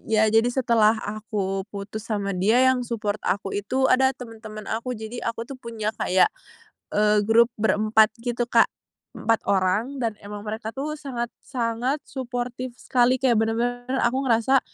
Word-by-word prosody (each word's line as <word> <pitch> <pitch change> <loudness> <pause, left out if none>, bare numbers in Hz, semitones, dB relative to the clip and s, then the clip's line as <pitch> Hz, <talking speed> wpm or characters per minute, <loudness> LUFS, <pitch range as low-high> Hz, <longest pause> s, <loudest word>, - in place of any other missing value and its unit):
ya, 220 -1 +4
jadi 225 +2 +4
setelah 230 -4 +3
aku 205 -2 -3
putus 205 +2 -7
sama 200 -3 -1
dia 215 +8 +3
yang 260 -1 +4
support 215 -4 -3
aku 195 0 -2
itu 260 +6 -1
ada 265 +1 +5
temen-temen 220 -3 -9
aku. 235 +3 -3
Jadi 220 +2 -6
aku 230 0 -3
tuh 260 +1 -10
punya 225 -2 -3
kayak, 185 0 +3 0.6
eee, 210 0 +3
grup 225 +2 +5
berempat 215 +1 +3
gitu 240 0 -1
Kak, - - +6 0.5
4 225 0 +1
orang 200 +8 +1
dan 225 -3 -1
emang 205 0 -7
mereka 220 +1 -5
tuh 300 +3 -4
sangat-sangat 245 0 -3
suportif 250 -1 -5
sekali 250 0 +2
kayak 245 -4 +3
bener-bener 240 +2 -1 0.2
aku 240 +3 +2
ngerasa, 240 +3 +4
225 Hz, 150 wpm, -24 LUFS, 215-245 Hz, 0.6 s, Kak